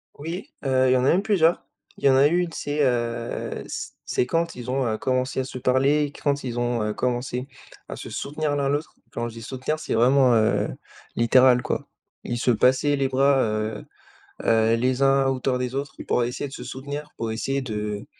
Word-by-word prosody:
Oui, 165 +6 -6 0.2
heu, 130 -1 +3
il 130 - +5
y - - +4
en 125 - +1
a - - +4
même 185 +4 +3
plusieurs. 175 -6 +2 0.3
Il - - -6
y 140 - +7
en 130 - +5
a 140 +2 +6
une 175 +1 0
c'est, 145 -1 -4
heu, 120 -2 -2
c - - -5
c'est - - 0
quand 165 +5 -1
ils 125 0 -7
ont, 135 0 0
heu, 110 - -1
commencé 130 +1 -1
à 130 - +1
se 130 - -7
parler, 140 +4 +2
quand 140 -1 0
ils 120 -1 -3
ont, 120 -1 0
heu, 105 0 -1
commencé 125 +1 -2 0.4
à - - -5
se - - -8
soutenir 150 +1 -2
l'un, 140 -1 0
l'autre, 145 +3 -2 0.2
quand 120 0 -3
je - - -11
dis 115 - -8
soutenir 130 +6 -3
c'est 150 - -3
vraiment, 125 +2 +5
heu, 110 -1 +2 0.5
littéral, 125 +1 +5
quoi, - - -3 0.4
ils 120 - -3
se 125 - +2
passaient 130 +5 +3
les 135 -1 +1
bras, 135 +1 +3
heu 110 0 -2 0.6
heu, 115 0 +3
les 125 +3 0
uns 135 0 +4
à - - +2
hauteur 130 -1 0
des 125 0 -3
autres 140 +1 -4
pour 125 - +2
essayer 125 +4 -3
de 135 - -12
se - - -7
soutenir, 140 +4 -6
pour 115 -1 -3
essayer 135 +5 -2
de, 105 -4 -4
130 Hz, 215 wpm, -24 LUFS, 120-140 Hz, 0.6 s, y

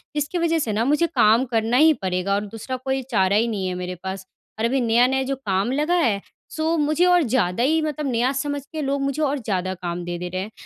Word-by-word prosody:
इसकी 295 +4 -1
वज़ह 330 -1 +1
से 225 -7 -1
ना 225 +3 0
मुझे 300 +4 +2
काम 230 -4 +3
करना 225 +2 +2
ही 315 +2 +6
पड़ेगा 185 +1 -1
और 205 +1 -2
दूसरा 225 +5 -6
कोई 265 0 0
चारा 195 -2 +2
ही 230 +2 +3
नहीं 200 -4 -2
है 180 - -3
मेरे 180 0 -5
पास। 190 0 -5 0.3
और 225 - +1
अभी 260 +2 +1
नया-नया 245 +3 +3
जो 270 +1 -2
काम 205 -2 -1
लगा 300 +5 0
है 225 - +1 0.3
सो 320 +1 0
मुझे 310 +4 +2
और 355 -2 +4
ज़्यादा 235 -4 0
ही 315 +4 +2
मतलब 300 -1 -3
नया 245 +3 +1
समझ 285 +1 -2
के 310 -1 -4
लोग 275 0 -1
मुझे 275 +2 -1
और 285 -1 0
ज़्यादा 185 -4 -2
काम 175 -1 -5
दे 175 0 -4
दे 180 0 -4
रहे 185 +1 -3
हैं। 210 +3 -7
245 Hz, 240 wpm, -22 LUFS, 195-290 Hz, 0.3 s, ही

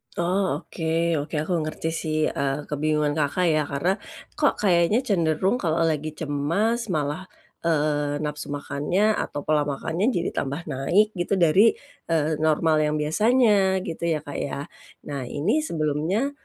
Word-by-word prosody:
Oh. 185 +3 0
Oke 165 0 -1
oke. 150 +2 -5
Aku 175 +1 0
ngerti 155 +1 -3
sih, 155 -1 -2
eee, 140 +1 -2
kebingungan 150 0 +1
Kakak 155 +5 +1
ya. 155 -2 +1
Karena, 175 +8 0 0.4
kok - - +3
kayaknya 195 +5 +3
cenderung 185 +4 +1
kalau 165 -4 +1
lagi 155 -1 -1
cemas, 170 +11 -1
malah, 155 0 -2 0.4
eee, 150 -2 +1
nafsu 150 0 -4
makannya, 145 +8 0
atau 145 - -3
pola 150 -1 +1
makannya 160 +8 -1
jadi 170 - 0
tambah 140 +4 -3
naik 170 +9 +1
gitu 185 0 -1
dari, 185 +5 +5 0.3
eee, 155 -2 +1
normal 155 0 +2
yang 150 0 0
biasanya, 195 +3 +3
gitu 170 0 -4
ya, 155 -3 0
Kak, 145 - -6
ya. 140 - -3 0.4
Nah, 135 -3 -5
ini 175 - 0
sebelumnya, 170 - -1
160 Hz, 145 wpm, -24 LUFS, 150-185 Hz, 0.4 s, dari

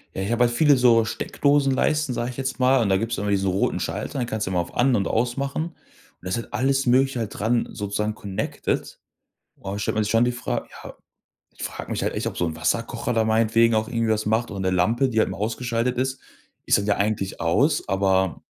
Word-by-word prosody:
Ja, 95 - -2
ich 105 - -2
habe 120 +1 +3
halt 120 - 0
viele 145 +1 +5
so 120 -3 +4
Steckdosenleisten, 140 +3 +1
sage 120 +2 -2
ich 125 - -12
jetzt 135 -1 -3
mal. 130 0 +4
Und 110 - +1
da 95 - +3
gibt's 115 +2 -2
immer 105 - -2
diese 100 -1 +1
roten 95 +1 0
Schalter, - - -4
die 125 - 0
kannst 110 -3 -3
du 95 - -2
immer 90 - +1
auf 85 - -4
an 125 +1 +3
und 100 -3 0
aus 120 +3 0
machen. 140 +3 -2
Und 170 - -9 0.5
da 90 - -5
ist 95 - 0
halt 115 - -7
alles 135 +2 +1
Mögliche 130 +1 +3
halt 110 -3 -4
dran 115 +3 +1
sozusagen 105 +1 -3
connected. 100 0 -3 0.6
Und 95 +1 -7
da - - -4
stellt - - -1
man 110 - +1
sich 105 - -3
schon 115 +1 +4
die 125 - +1
Fra 120 - -3 0.2
ja, - - -9 0.6
ich - - -10
frage - - -6
mich - - -2
halt - - 0
echt, - - -3
ob - - -3
so 85 - 0
'n 80 -1 -4
Wasserkocher 80 - -1
da 115 -1 +2
meinetwegen 115 +1 +3
auch 110 0 0
irgendwie 115 -2 0
was 110 -1 -1
macht 110 +2 +1
oder 100 -2 -5
'ne 95 -1 0
Lampe, 115 +9 +2
die 115 - -1
halt - - +1
mal - - -6
ausgeschaltet 120 +2 -1
ist. 130 +1 -2 0.5
Ist - - +5
dann 100 - -2
ja 105 - +2
eigentlich 100 -2 -2
aus, - - +1
aber 95 -4 +1
115 Hz, 245 wpm, -23 LUFS, 100-125 Hz, 0.6 s, viele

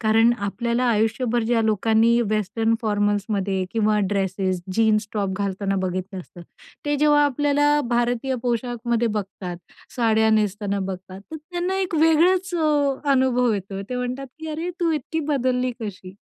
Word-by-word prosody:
कारण 225 +1 +4
आपल्याला 235 +4 -1
आयुष्यभर 230 +1 +1
ज्या 230 0 +1
लोकांनी 225 +2 +3
वेस्टर्न 220 +2 0
फॉर्मल्समध्ये 205 -2 0
किंवा 215 -2 +2
ड्रेसेस, 190 -2 -1
जीन्स 215 -1 +2
टॉप 200 -3 -1
घालताना 195 0 -2
बघितलं 185 +1 -3
असतं, 175 0 -13 0.4
ते 290 0 0
जेव्हा 295 0 +4
आपल्याला 290 +1 +2
भारतीय 240 +2 0
पोशाखमध्ये 240 -1 -1
बघतात, 195 -4 -4 0.4
साड्या 220 -2 +3
नेसताना 205 -1 0
बघतात, 190 0 -6
तर 320 - -5
त्यांना 355 +4 -3
एक 365 -3 -2
वेगळंच 345 +4 +3
अ, 295 -4 +2 0.2
अनुभव 250 -2 +2
येतो, 195 -1 -4
ते 250 +6 -5
म्हणतात 250 +2 -3
की 320 0 -7
"अरे, 325 +3 -3
तू 340 -1 +2
इतकी 315 +2 -2
बदलली 255 -1 0
कशी?" 190 -4 -7
230 Hz, 140 wpm, -23 LUFS, 205-270 Hz, 0.4 s, कारण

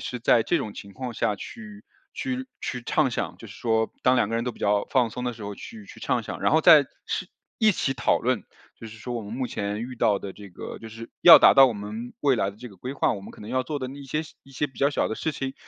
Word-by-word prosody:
是 125 - -5
在 115 -1 +4
这 - - +1
种 105 - -3
情 100 - -10
况 125 -2 -5
下 105 -1 0
去 215 - -10 0.3
去 260 -1 -3
去 125 -2 -4
畅 - - +1
想， - - -3
就 - - -11
是 - - -12
说 110 -1 0
当 130 0 +4
两 120 -4 +2
个 115 - -3
人 115 - 0
都 125 - -2
比 - - -18
较 100 0 +2
放 125 -4 +3
松 125 +3 -5
的 125 - -1
时 115 -2 -11
候 100 0 -5
去 215 - -11
去 230 - -13
畅 - - 0
想， - - -7
然 - - +2
后 - - +5
再 - - +8 0.2
是 - - -2 0.3
一 220 -2 +5
起 135 -5 -1
讨 120 - +2
论， 125 -4 -1 0.3
就 115 - -9
是 110 0 -11
说 120 +2 -5
我 115 - -3
们 100 - -8
目 125 +1 -2
前 105 -1 -3
遇 125 +1 -7
到 105 -3 +2
的 100 -1 -7
这 100 -1 -11
个 90 - -8
就 115 - -10
是 115 +1 -9
要 170 - +11
达 - - +7
到 135 - +9
我 125 - 0
们 105 +4 -6
未 140 -4 +3
来 100 - 0
的 100 - -17
这 125 +3 -9
个 100 - -16
规 125 +8 -6
划， 140 - +1
我 100 - -7
们 - - -10
可 - - -15
能 105 - -9
要 130 0 +1
做 145 +3 -4
的 130 - -4
一 140 +2 -9
些 150 +3 -2 0.2
一 135 - -19
些 145 +3 -1
比 135 - -17
较 140 +1 +3
小 145 - 0
的 - - -3
事 160 - -2
情， 135 -1 -4
120 Hz, 315 characters per minute, -25 LUFS, 110-135 Hz, 0.3 s, 要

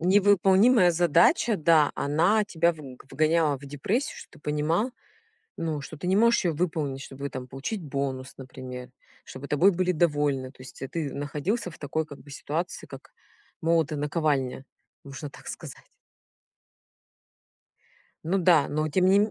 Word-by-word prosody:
Невыполнимая 195 +2 +5
задача, 175 +7 +3
да, 155 -2 +4
она 175 +10 +2
тебя 170 -3 +1
вг 135 -6 -12
вгоняла 155 -2 +2
в 140 - -13
депрессию, 185 - -2
что - - -11
ты - - -16
понимал, 155 - 0 0.7
ну, 160 -3 -2
что 155 +2 -9
ты 180 - -6
не 190 - +3
можешь 235 0 +4
её 170 -3 +1
выполнить, 150 -5 -2
чтобы 140 +1 -7
там 130 -1 -6
получить 140 - -5
бонус, 135 -3 -4
например, 130 -1 -9 0.3
чтобы 130 +2 -9
тобой 170 +7 +4
были 180 0 0
довольны. 145 -5 +1
То 130 - -23
есть, 130 - -12
э, 135 - -4
ты 150 -3 -3
находился 150 - -2
в - - -14
такой, 155 +2 -2
как 145 -2 -11
бы, 145 - -15
ситуации, 160 +5 -4
как - - -12 0.5
молот 165 -2 +1
и - - -1
наковальня, 145 -3 -1 0.4
можно 140 +1 -8
так - - -15
сказать. - - -9 2.4
Ну 190 +4 +1
да, 170 -5 +4
но 155 +1 -1
тем 180 +5 +1
не 195 +2 +5
ме 210 0 +1
155 Hz, 160 wpm, -26 LUFS, 140-180 Hz, 2.4 s, Невыполнимая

